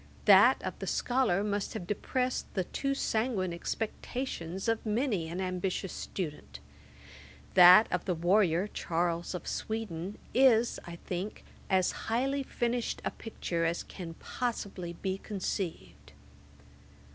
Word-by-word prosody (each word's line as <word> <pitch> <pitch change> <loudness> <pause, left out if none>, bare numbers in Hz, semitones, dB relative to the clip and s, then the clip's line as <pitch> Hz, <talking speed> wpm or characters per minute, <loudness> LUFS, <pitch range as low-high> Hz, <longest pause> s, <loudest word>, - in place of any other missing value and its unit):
That - - +7
of - - -2
the - - -5
scholar 240 -7 +1
must 205 -1 -2
have 175 - -4
depressed 250 +6 -2
the 190 - +1
too 275 +9 -2
sanguine 220 -8 0
expectations 195 -1 -4
of 225 -1 +1
many 215 - 0
an 175 +3 -4
ambitious 185 0 -2
student. 160 -6 -5 0.9
That 185 +4 +9
of 180 - -1
the 180 - 0
warrior, 175 +1 +3
Charles 170 -2 -1
of 180 - -6
Sweden, 205 -4 -4 0.2
is, 240 -3 +4
I 170 - -6
think, 185 +3 -4 0.3
as 185 -1 +3 0.2
highly 270 +5 +1
finished 240 -2 -2
a - - 0
picture 175 -6 -3
as 165 +1 0
can 170 -4 -8
possibly 195 -8 -4
be 190 +2 -3
conceived. 195 -3 -5
195 Hz, 125 wpm, -31 LUFS, 175-225 Hz, 0.9 s, That